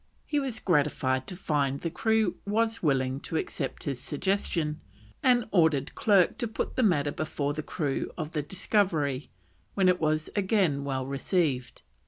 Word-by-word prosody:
He 295 - 0
was 260 -5 -2
gratified 130 -6 +1
to 180 - -6
find 140 -6 0
the 165 - -2
crew 220 +1 +1
was 225 +2 0
willing 135 -3 +1
to 160 - -3
accept 135 -3 -3
his 135 -3 -3
suggestion, 155 0 -1 0.4
and 245 -2 +4
ordered 160 -7 +3
Clerke 195 -5 +3
to 235 - -1
put 220 - -3
the - - +2
matter 150 - +3
before 145 -1 -2
the 155 - -3
crew 145 -3 -2
of 155 -2 -4
the 155 -4 -1
Discovery, 155 -5 0 0.5
when 190 -2 +3
it 180 0 +4
was 155 0 0
again 190 -8 +2
well 130 -2 -2
received. 140 -1 -1
160 Hz, 160 wpm, -28 LUFS, 140-200 Hz, 0.5 s, and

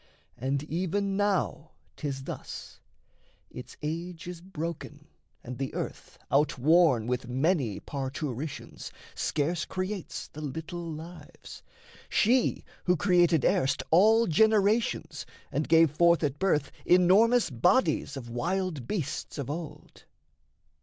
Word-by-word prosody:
And 135 +3 -2
even 185 +5 -1
now 190 -6 -1 0.2
'tis 135 -3 -4
thus: - - -8 0.7
Its 125 0 -10
age 165 +2 -4
is 175 -1 -7
broken 170 -3 -6 0.4
and 125 +1 -7
the 135 -1 -2
earth, - - -6
outworn 150 -2 +4
With 125 0 -2
many 130 - 0
parturitions, 140 0 -5 0.2
scarce 160 +3 -1
creates 185 0 -4
The 155 - -10
little 160 +4 -5
lives 165 +3 -10 0.5
she 245 +3 +2 0.2
who 180 -1 +3
created 175 -4 +3
erst 130 - +2
All 220 +7 +6
generations 205 - +2 0.2
and 150 +3 -2
gave 165 -2 +6
forth 170 +2 +4
at 145 -1 -1
birth 155 -7 +1
Enormous 200 - +4
bodies 140 - +2
of 125 -3 -7
wild 165 +2 -2
beasts 170 -6 -4
of 140 -1 -3
old. 150 -2 -8
160 Hz, 110 wpm, -28 LUFS, 140-185 Hz, 0.7 s, All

